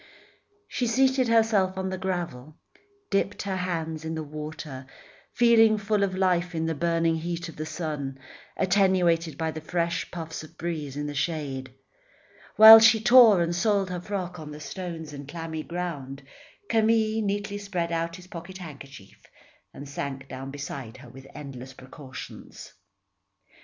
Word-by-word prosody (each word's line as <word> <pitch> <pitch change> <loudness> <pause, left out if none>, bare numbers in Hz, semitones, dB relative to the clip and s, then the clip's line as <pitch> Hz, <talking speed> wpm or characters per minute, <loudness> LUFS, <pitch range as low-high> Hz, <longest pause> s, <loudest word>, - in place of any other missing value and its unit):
She 245 - -2
seated 260 +2 +3
herself 220 -5 +3
on 190 0 -2
the 185 - -3
gravel, 170 -7 -4 0.6
dipped 195 +1 0
her 195 -2 -2
hands 165 -3 -3
in 160 0 -4
the 160 - -4
water, 150 -2 -7 0.5
feeling 225 -2 +5
full 210 0 0
of 185 -1 -1
life 180 -2 +1
in 160 0 -1
the 165 - 0
burning 165 +1 +1
heat 170 +1 -4
of 165 - -11
the 155 +1 -5
sun, 150 -4 -4 0.4
attenuated 180 -4 +2
by 160 -1 -1
the 155 - -7
fresh 170 +1 -2
puffs 165 -2 -6
of 160 +1 -15
breeze 155 -5 -4
in 145 - -3
the 145 - -4
shade. 140 -4 -3 0.8
While 220 +1 +12
she 225 0 +6
tore 230 -5 +7
and 170 +1 -2
soiled 195 0 +1
her 180 -1 -4
frock 180 -2 -4
on 155 -1 -8
the 150 0 -9
stones 165 -1 -7
and 140 -1 -8
clammy 160 0 -5
ground, 150 -6 -5 0.4
Camille 220 0 +2
neatly 205 0 -2
spread 180 -4 -3
out 165 0 -2
his 180 0 -12
pocket 180 +1 -9
handkerchief 140 - -12 0.4
and 140 - -10
sank 135 -1 -5
down 135 +1 -7
beside 135 -4 -7
her 130 -2 -13
with 135 +2 -13
endless 130 -2 -9
precautions. 130 0 -11
170 Hz, 155 wpm, -26 LUFS, 150-190 Hz, 0.8 s, While